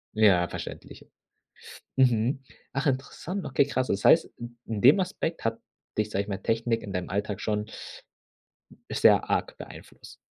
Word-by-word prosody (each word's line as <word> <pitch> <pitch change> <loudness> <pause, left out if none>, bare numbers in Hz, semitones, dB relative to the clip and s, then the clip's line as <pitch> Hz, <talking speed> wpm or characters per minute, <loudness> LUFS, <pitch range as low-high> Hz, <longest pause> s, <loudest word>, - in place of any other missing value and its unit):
Ja, 95 -5 +5
verständlich. - - -8 0.9
Mhm. 125 +1 +2 0.3
Ach, 135 +2 -1
interessant. 150 +8 -2
Okay, 135 +1 +2
krass. 130 -2 -1
Das 100 - -1
heißt, - - +7
i 120 - -6 0.2
in 110 -3 -4
dem 140 +10 +7
Aspekt 180 -3 -3
hat 115 0 -1 0.4
dich, 105 0 0
sage 100 -1 -1
ich - - -15
mal, 95 - -2
Technik 115 +3 -1
in 100 - -7
deinem 90 -1 -3
Alltag 100 +1 -2
schon 105 -1 -1 1.3
sehr - - +5
arg - - -1
beeinflusst. - - -12
115 Hz, 150 wpm, -27 LUFS, 105-135 Hz, 1.3 s, heißt